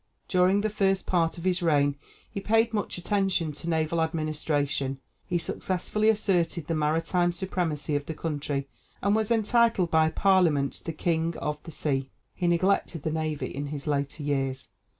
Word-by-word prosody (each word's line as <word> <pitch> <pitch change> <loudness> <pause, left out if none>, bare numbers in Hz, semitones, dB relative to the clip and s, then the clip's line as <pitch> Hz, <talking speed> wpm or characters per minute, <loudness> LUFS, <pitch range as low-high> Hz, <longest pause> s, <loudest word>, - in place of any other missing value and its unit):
During 185 +2 +3
the 215 - 0
first 195 -2 +1
part 170 -2 +1
of 170 - -8
his 185 -1 +1
reign 145 -4 +3 0.3
he - - -5
paid 225 +3 +2
much 205 -3 -2
attention 190 -3 0
to 150 +3 -6
naval 160 0 +1
administration; 150 -4 -1 0.3
he 175 - +1
successfully 185 +5 -1
asserted 180 -6 +1
the 165 - -2
maritime 165 +3 +1
supremacy 170 -5 -2
of 145 0 -2
the 160 - -4
country, 145 -3 -3 0.4
and 200 +1 +3
was 220 -1 0
entitled 230 -4 +3
by 160 0 +4
parliament 165 -7 +2
the 165 - -2
"king 165 +1 -1
of 150 0 -3
the - - -7
sea;" 135 -3 -2 0.2
he 175 - -1
neglected 175 -2 +1
the 160 - -1
navy 155 -1 -2
in 145 +1 -3
his 145 -1 -6
later 145 0 -2
years. 135 -2 -2
165 Hz, 165 wpm, -27 LUFS, 150-185 Hz, 0.4 s, by